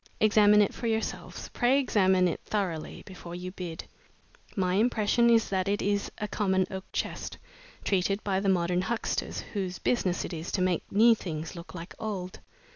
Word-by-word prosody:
Examine 210 -1 +6
it 200 - -1
for 235 - -4
yourselves 225 0 -3
pray 250 +2 +3
examine 190 -8 +3
it 170 - -2
thoroughly 180 -7 -3
before 175 -2 -9
you 180 +1 -6
bid. 175 -3 -6 0.7
My 185 -3 +1
impression 230 +2 +3
is 230 -1 +4
that 190 0 0
it 205 +1 +1
is 200 0 0
a 210 - -3
common 190 -3 +1
oak 190 0 -5
chest, - - -3 0.5
treated 195 +1 +1
by 190 -2 +1
the 195 0 0
modern 175 -1 +2
huckster 220 +4 -2 0.2
whose 185 -3 -2
business 190 -8 0
it - - -6
is 165 +1 -5
to 190 - +1
make 180 -2 -1
new 230 +3 +6
things 165 -6 -5
look 170 0 -10
like 170 +1 -8
old. 190 -4 -4
190 Hz, 175 wpm, -28 LUFS, 180-210 Hz, 0.7 s, Examine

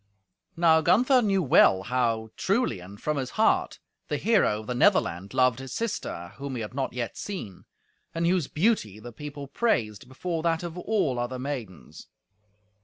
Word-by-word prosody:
Now 165 -1 +5
Gunther 245 - +4
knew 195 -4 +1
well 95 -8 +5
how, 115 -2 -1
truly 195 - 0
and 95 +3 -12
from 150 -1 -2
his 130 -2 -2
heart, 220 - +2 0.3
the - - -1
hero 200 - +2
of - - -12
the 125 - -3
Netherland 100 - +2
loved 130 -2 +2
his 135 -1 -7
sister 140 - -4
whom 140 -1 -5
he 115 - -3
had 105 - -7
not 135 0 -2
yet 120 -2 -4
seen, 115 - -7 0.5
and 165 0 0
whose 175 -4 +2
beauty 155 - 0
the 120 +2 -10
people 145 +2 -7
praised 120 - -1
before 165 +6 -4
that 165 0 0
of 170 -1 -6
all 180 - 0
other 120 +1 -3
maidens. 120 - -7
135 Hz, 170 wpm, -26 LUFS, 115-175 Hz, 0.5 s, Now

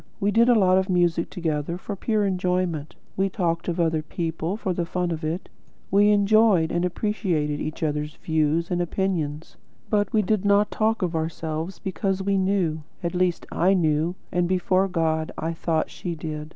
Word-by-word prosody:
We 200 +1 +1
did 230 +3 +4
a 240 - +6
lot 185 -2 +4
of 190 +1 -2
music 175 -2 +2
together 165 -2 -2
for 200 +2 -6
pure 210 +1 0
enjoyment; 180 -5 -1 0.2
we 195 +1 +1
talked 170 -3 -1
of 175 0 -2
other 160 -2 +2
people 165 +3 -3
for 190 -4 -2
the 175 - -1
fun 175 +1 -2
of 160 -1 -4
it; 160 +4 -3 0.4
we 205 +2 +5
enjoyed 205 -4 +4
and 175 - 0
appreciated 180 -6 -1
each 155 +1 -4
other's 150 0 -2
views 160 +2 0
and 175 0 +1
opinions; 165 -4 -2 0.3
but 205 -2 +2
we 215 -1 +2
did 210 0 +1
not 205 0 +3
talk 220 -1 +1
of 175 -2 -1
ourselves, 160 +2 -3
because 190 +1 -2
we 200 0 +1
KNEW, 185 -5 +1 0.2
at 170 - -1
least 180 -1 0
I 185 +3 +3
knew, 160 0 +1 0.2
and, 175 -1 +1
before 185 +1 +2
God, 160 -3 0
I 165 +1 -2
thought 160 -1 -1
she 175 -2 -5
did. 155 -1 -6
175 Hz, 180 wpm, -24 LUFS, 160-195 Hz, 0.4 s, a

